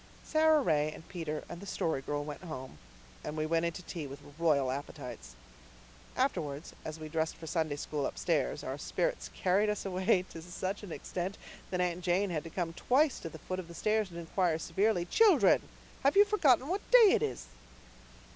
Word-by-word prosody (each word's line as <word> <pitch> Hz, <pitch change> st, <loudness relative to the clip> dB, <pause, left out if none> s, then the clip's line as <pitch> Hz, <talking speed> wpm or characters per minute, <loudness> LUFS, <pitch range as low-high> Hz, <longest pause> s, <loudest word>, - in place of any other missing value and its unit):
Sara 315 Hz, -1 st, +4 dB
Ray 155 Hz, -2 st, +2 dB
and 160 Hz, -, -12 dB
Peter 160 Hz, -4 st, -4 dB
and 170 Hz, -, -8 dB
the 200 Hz, -, -9 dB
Story 160 Hz, -6 st, -1 dB
Girl 145 Hz, +2 st, -2 dB
went 145 Hz, -1 st, -7 dB
home, 130 Hz, -, -7 dB, 0.4 s
and 150 Hz, +1 st, -5 dB
we 155 Hz, -, 0 dB
went 165 Hz, +1 st, +1 dB
in -, -, -1 dB
to 180 Hz, -, -8 dB
tea 165 Hz, -3 st, -5 dB
with 140 Hz, +1 st, -9 dB, 0.2 s
royal 140 Hz, -6 st, +3 dB
appetites. 125 Hz, -, -7 dB, 0.8 s
Afterwards, 155 Hz, -, -1 dB
as 155 Hz, 0 st, -6 dB
we 155 Hz, -, -6 dB
dressed 160 Hz, +1 st, -1 dB
for 165 Hz, -, -10 dB
Sunday 160 Hz, -2 st, -1 dB
School 145 Hz, 0 st, -2 dB
upstairs, 60 Hz, -, -1 dB
our -, -, -4 dB
spirits -, -, -1 dB
carried 195 Hz, +3 st, +2 dB
us 210 Hz, -1 st, -2 dB
away 185 Hz, 0 st, +2 dB
to 165 Hz, -, -8 dB
such 185 Hz, +3 st, -4 dB
an 205 Hz, -5 st, -8 dB
extent 185 Hz, +4 st, -4 dB, 0.3 s
that 180 Hz, -1 st, -1 dB
Aunt 180 Hz, 0 st, -1 dB
Janet 180 Hz, +3 st, +1 dB
had 155 Hz, -3 st, -2 dB
to -, -, -6 dB
come 165 Hz, -1 st, -3 dB
twice 270 Hz, -, +2 dB
to 165 Hz, -, -6 dB
the 160 Hz, -, -10 dB
foot 185 Hz, +4 st, -5 dB
of 180 Hz, -, -6 dB
the 170 Hz, -, -11 dB
stairs 215 Hz, 0 st, +1 dB
and 170 Hz, -, -9 dB
inquire 170 Hz, 0 st, 0 dB
severely, 175 Hz, +3 st, +1 dB
"Children, 440 Hz, -, +5 dB, 0.4 s
have 280 Hz, +7 st, +3 dB
you 410 Hz, -, +9 dB
forgotten 290 Hz, -, +3 dB
what 375 Hz, +5 st, -1 dB
day 470 Hz, -5 st, +7 dB
this 445 Hz, -, -2 dB
is?" -, -, -12 dB
170 Hz, 195 wpm, -32 LUFS, 155-200 Hz, 0.8 s, you